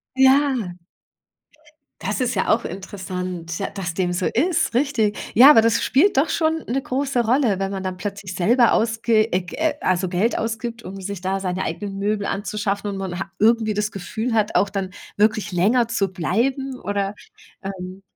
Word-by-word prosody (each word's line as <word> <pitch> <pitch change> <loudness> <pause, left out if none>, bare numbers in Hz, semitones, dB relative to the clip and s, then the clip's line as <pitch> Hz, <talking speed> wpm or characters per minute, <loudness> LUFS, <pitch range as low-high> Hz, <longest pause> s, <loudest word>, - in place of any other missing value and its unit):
Ja. 265 -7 +3 1.3
Das 205 +6 -2
ist 245 0 0
ja - - 0
auch 230 +2 +2
interessant, 180 -2 -5
ja, 195 - -2
dass 180 -5 -5
dem 180 0 -1
so 180 +1 -1
ist, 320 +1 +1
richtig. 240 -6 +1 0.2
Ja, 260 +6 +9
aber 225 - +8
das 230 0 +2
spielt 300 +9 +3
doch 290 +4 +3
schon 320 0 0
'ne 265 +4 -1
große 260 -2 -1
Rolle, 230 -5 +2
wenn 195 0 -2
man 195 -1 -4
dann 185 -1 -4
plötzlich 200 -1 -6
selber 235 +7 +4
ausge 225 0 +2
äh, 180 - +2
Ge 300 - -1
also, 185 0 +1
Geld 190 +6 0
ausgibt, 230 +1 -4
um 195 +1 -8
sich 200 0 -5
da 190 +1 -2
seine 185 0 -2
eigenen 200 -1 -4
Möbel 205 0 -1
anzuschaffen 205 0 -2
und 200 - -4
man 185 -2 -4
ha 195 - -4
irgendwie 220 0 +3
das 210 +1 -1
Gefühl 220 +5 -4
hat, 215 -2 +1
auch 200 - +3
dann 195 -2 -3 0.3
wirklich 215 -1 +2
länger 220 +7 +2
zu 220 -4 +1
bleiben 255 - -1
oder 200 0 -2 0.5
ähm, 190 -1 -7
210 Hz, 180 wpm, -22 LUFS, 190-235 Hz, 1.3 s, Ja